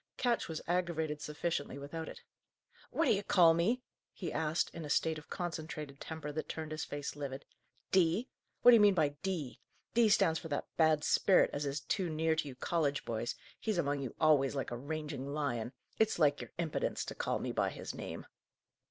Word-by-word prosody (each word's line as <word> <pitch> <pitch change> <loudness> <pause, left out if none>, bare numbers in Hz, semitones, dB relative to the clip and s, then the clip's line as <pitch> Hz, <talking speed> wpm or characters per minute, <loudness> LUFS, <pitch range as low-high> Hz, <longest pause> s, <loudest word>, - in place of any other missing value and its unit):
Ketch 240 -2 +1
was 160 -1 -5
aggravated 165 -4 0
sufficiently 150 -2 -2
without 150 +3 -6
it. - - -11 0.7
"What 330 - +1
d'ye 200 - +3
call 175 -5 +6
me?" 220 +10 +1 0.3
he 170 -5 -5
asked, 160 +1 0
in 165 - -6
a 150 - -6
state 160 +1 +1
of 155 - -17
concentrated 155 -5 -5
temper 160 -2 -5
that 155 +2 -4
turned 155 -1 -5
his 155 0 -3
face 145 -1 -5
livid. 140 -1 -5 0.5
"'D?' 185 +6 +3 0.4
What 245 - +10
d'ye 235 - +8
mean 205 -2 +6
by 155 -4 +3
'D?' 175 -10 -3 0.3
D 230 -1 +5
stands 165 -6 +4
for - - -7
that 145 -2 -2
bad 155 -2 +4
sperit 190 - +4
as 145 0 -2
is 140 +1 -2
too 185 -4 -1
near 160 0 +1
to 160 -2 -1
you 135 - -7
college 145 0 0
boys; 115 +1 -2 0.2
he's 215 -4 -1
among 145 -4 0
you 130 -4 -5
always, 145 -4 +4
like 135 - -2
a - - -2
ranging 145 +1 -4
lion. 120 -6 -1 0.3
It's 220 0 +3
like 145 -3 +3
your - - -7
impedence 170 -3 -1
to - - -5
call - - -1
me - - -3
by - - +1
his - - -6
name." - - -6
155 Hz, 195 wpm, -34 LUFS, 145-175 Hz, 0.7 s, What